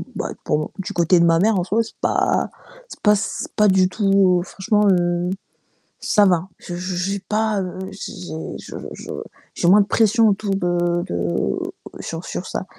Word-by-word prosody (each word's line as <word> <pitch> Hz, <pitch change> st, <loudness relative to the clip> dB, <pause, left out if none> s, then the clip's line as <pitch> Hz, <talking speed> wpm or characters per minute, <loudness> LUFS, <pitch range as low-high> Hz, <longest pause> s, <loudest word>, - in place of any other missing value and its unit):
bah, -, -, -3 dB
pour 150 Hz, -, +1 dB
mon 155 Hz, -, -4 dB
du 190 Hz, -, -4 dB
côté 175 Hz, +1 st, +3 dB
de 170 Hz, -, +5 dB
ma 165 Hz, 0 st, +4 dB
mère, 215 Hz, +1 st, +3 dB
en -, -, 0 dB
soi, 210 Hz, +5 st, +1 dB
c'est 225 Hz, -, -12 dB
pas -, -, +1 dB, 0.4 s
c'est -, -, -11 dB
pas 210 Hz, 0 st, +5 dB
c 220 Hz, +2 st, -3 dB
pas 210 Hz, -1 st, +4 dB
du 190 Hz, -1 st, +4 dB
tout 195 Hz, +1 st, 0 dB
oh, 185 Hz, -3 st, +4 dB
franchement, 210 Hz, +2 st, +1 dB
heu, 175 Hz, 0 st, +1 dB, 0.7 s
ça 205 Hz, -2 st, +3 dB
va, 180 Hz, -2 st, +2 dB
je 175 Hz, -, -7 dB
je 180 Hz, +1 st, -4 dB
j'ai 195 Hz, +3 st, -1 dB
pas, 215 Hz, +1 st, 0 dB
heu, 185 Hz, +1 st, -6 dB
j'ai 200 Hz, -, -7 dB, 0.5 s
je -, -, -10 dB, 0.2 s
je -, -, -10 dB, 0.5 s
j'ai 170 Hz, -, 0 dB
moins 205 Hz, +3 st, +7 dB
de 200 Hz, -, -1 dB
pression 225 Hz, 0 st, +4 dB
autour 200 Hz, 0 st, -1 dB
de 175 Hz, -1 st, 0 dB
de 85 Hz, 0 st, -1 dB, 0.4 s
sur 165 Hz, +1 st, -5 dB
sur 185 Hz, -, -5 dB
ça. -, -, -4 dB
185 Hz, 190 wpm, -21 LUFS, 175-205 Hz, 0.7 s, moins